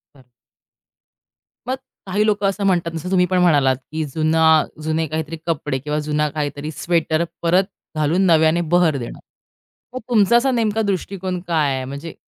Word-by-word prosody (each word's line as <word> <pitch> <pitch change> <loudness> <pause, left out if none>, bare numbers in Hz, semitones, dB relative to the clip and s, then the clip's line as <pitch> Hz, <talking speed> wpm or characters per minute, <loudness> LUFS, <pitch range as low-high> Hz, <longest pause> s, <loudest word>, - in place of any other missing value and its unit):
बरं. 130 -2 -20 1.4
मग 260 - 0 0.3
काही 205 +2 0
लोक 210 -1 0
असं 195 +1 0
म्हणतात 175 -3 +1
जसं 165 +3 -5
तुम्ही 180 -1 +4
पण 185 +1 0
म्हणालात, 145 -7 +4 0.2
की 160 0 -2
जुना 160 0 +4 0.2
जुने 160 +1 -1
काहीतरी 160 +1 -4
कपडे 150 -4 -1
किंवा 150 +3 -2
जुना 150 0 0
काहीतरी 145 0 -4
स्वेटर 160 +1 0 0.2
परत 175 +3 +3 0.3
घालून 155 +4 +1
नव्याने 160 -1 +4
बहर 175 -4 +3
देणं. 120 -3 -7 0.8
मग - - -2
तुमचा 230 -1 +4
असा 260 +3 +3
नेमका 225 -3 0
दृष्टिकोन 190 -2 -3
काय 155 -5 +1
आहे? 130 0 -3
म्हणजे 140 +5 -7
165 Hz, 155 wpm, -20 LUFS, 150-185 Hz, 1.4 s, तुम्ही